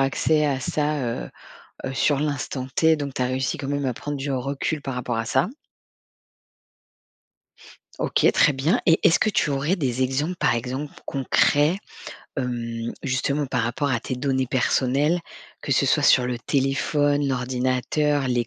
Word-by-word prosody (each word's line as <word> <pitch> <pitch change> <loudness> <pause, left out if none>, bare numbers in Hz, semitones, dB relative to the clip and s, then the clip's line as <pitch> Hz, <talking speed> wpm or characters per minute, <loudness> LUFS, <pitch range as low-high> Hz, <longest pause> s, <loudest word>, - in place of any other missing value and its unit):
accès 150 +3 +2
à 140 -3 0
ça, 150 +3 -1
heu 115 - -3 0.5
heu, 135 - -3
sur 145 +1 +2
l'instant 145 -3 -2
t. 160 -1 +4
Donc 140 -2 -5
tu - - -1
as - - +2
réussi 130 0 -1
quand 135 - -6
même 145 -1 -1
à 125 - -1
prendre 145 +4 -5
du 140 0 -3
recul 140 +3 -2
par 135 -2 -4
rapport 125 -1 -3
à 115 - -1
ça. 130 - +2 2.5
OK, - - +3
très 150 - +4
bien. 150 - +1
Et 165 -1 +5
est-ce 165 - +5
que 215 - +2
tu 170 - +1
aurais 140 +6 +1
des 130 -7 -1
exemples, 145 +7 -1
par 120 - +2
exemple 130 +5 -4
concrets, 145 +5 +2 0.6
hem, 115 -2 -3
justement 140 +2 0
par 125 -1 -1
rapport 130 +5 -1
à 115 - 0
tes 130 - -4
données 130 0 0
personnelles, 135 +6 +1 0.4
que - - -6
ce - - +3
soit - - +2
sur 125 - +5
le 125 -1 -2
téléphone, 145 +2 +1
l'ordinateur, 130 +3 0
les 120 -2 0
135 Hz, 165 wpm, -24 LUFS, 125-145 Hz, 2.5 s, Et